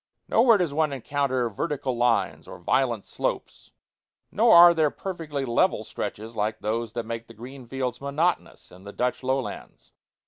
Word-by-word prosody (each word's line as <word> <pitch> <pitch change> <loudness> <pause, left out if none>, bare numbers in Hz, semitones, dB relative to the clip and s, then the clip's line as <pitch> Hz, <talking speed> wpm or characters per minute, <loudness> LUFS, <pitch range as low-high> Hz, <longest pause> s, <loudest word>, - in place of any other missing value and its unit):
Nowhere 230 -1 +5
does 175 -6 -1
one 155 0 +1
encounter 135 -1 -1
vertical 135 +3 -3
lines 120 -1 0
or - - -9
violent 120 -6 0
slopes; - - -4 0.6
nor 225 0 +5
are 170 0 +9
there 160 -3 +2
perfectly 155 -6 -5
level 120 -2 +1
stretches 110 +2 -6
like 105 0 -1
those 110 +1 -3
that 120 -1 -4
make 115 0 -6
the 115 - -14
green 125 +3 -11
fields 125 -1 -4
monotonous 140 - -2
in 90 +1 -15
the 100 0 -10
Dutch 125 0 -1
lowlands. 130 0 -4
130 Hz, 160 wpm, -25 LUFS, 115-150 Hz, 0.6 s, are